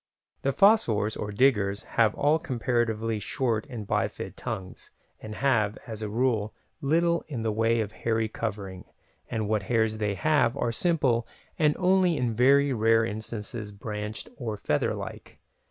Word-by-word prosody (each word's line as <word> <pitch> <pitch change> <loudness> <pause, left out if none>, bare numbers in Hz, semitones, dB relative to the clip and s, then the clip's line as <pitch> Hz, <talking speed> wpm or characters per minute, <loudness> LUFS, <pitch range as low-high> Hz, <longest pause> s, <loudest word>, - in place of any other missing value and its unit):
The 135 - 0
fossors, 120 - +3
or 105 - -4
"diggers", 100 -4 +2
have 110 -3 +2
all 150 +3 +3
comparatively 120 -6 -1
short 115 +2 -1
and 110 -5 -6
bifid - - -2
tongues, 95 -1 -6 0.3
and 110 0 -7
have, 115 -6 +1
as 110 -2 -7
a 105 - -3
rule, 110 -2 0 0.3
little 170 +4 +2
in 125 -7 -4
the 110 - 0
way 115 +1 +2
of 105 -1 -4
hairy 110 0 -1
covering, 100 -4 -5 0.4
and 110 -2 -2
what 110 -1 +1
hairs 110 -2 +2
they 105 -2 0
have 145 -1 +2
are 120 - 0
simple 130 -5 +1 0.3
and 150 -2 +3
only 185 -2 +3
in 120 -2 0
very 140 +4 +4
rare 115 0 +3
instances 110 0 -5
branched 105 +1 -6
or 115 -6 -4
feather - - 0
like. - - -8
115 Hz, 155 wpm, -27 LUFS, 105-135 Hz, 0.4 s, very